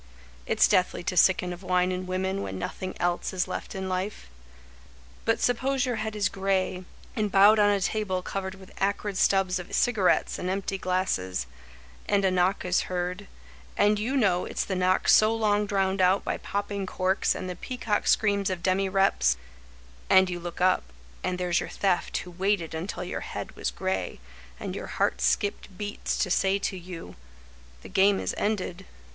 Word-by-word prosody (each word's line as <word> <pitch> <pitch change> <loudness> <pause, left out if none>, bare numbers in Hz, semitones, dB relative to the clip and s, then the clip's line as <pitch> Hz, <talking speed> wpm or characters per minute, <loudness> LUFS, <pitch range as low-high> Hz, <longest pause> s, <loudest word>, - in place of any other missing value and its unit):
It's - - +4
deathly 180 -1 +1
to 185 - -2
sicken 180 0 +4
of 175 - -10
wine 180 -1 +1
and 185 0 -4
women 190 +1 -1
When 95 - -5
nothing 185 - -5
else 175 +1 -1
is 185 0 0
left 185 - -5
in 190 0 -3
life. 185 - -4 0.9
But 225 0 +2
suppose 260 +3 +1
your 245 -3 -1
head 215 0 -3
is 205 -2 +2
gray, 190 -1 -1 0.3
and 210 -2 -1
bowed 205 +3 +7
On 205 0 +5
a 200 -1 +2
table 190 -2 -1
covered 190 0 -4
with 190 -1 -15
acrid 200 +1 -1
stubs 185 -1 +2
Of 180 - -9
cigarettes 215 -7 +2
and 180 - -2
empty 195 0 -2
glasses, 95 - -1 0.6
And 200 -1 +3
a 190 - +3
knock 185 +2 +1
is 180 0 +1
heard, 180 +2 -3 0.5
and 205 0 +3
you 250 +6 -1
know 185 -7 +2
it's - - -2
the 195 - -3
knock 185 0 +2
So 215 +1 +6
long 210 -2 +1
drowned 195 -2 +1
out 185 +2 +4
by - - -2
popping 200 -1 -3
corks 185 +1 +1
And 185 - -5
the 180 - -4
pea 255 +8 -6
cock 210 -4 -1
screams 200 -2 +2
of 180 -2 -4
demireps— 190 - +2 0.7
And 190 -1 +5
you 175 - -3
look 175 0 -7
up, 185 +1 +3 0.4
and 180 0 -1
there's 180 -1 +1
your - - -5
Theft, 190 -3 0
Who 180 - -6
waited 185 -2 0
until 175 +3 -4
your 180 - -4
head - - -6
was - - -2
gray, 95 -5 -3 0.4
And - - -4
your - - -5
heart - - 0
skipped 200 -2 0
beats 205 0 -3
to 185 - -3
say 190 +2 +2
to 200 - -2
you: 175 - -9 0.7
The - - -10
game 195 +1 +4
is - - -2
ended. 195 -3 -2
190 Hz, 180 wpm, -27 LUFS, 180-205 Hz, 0.9 s, bowed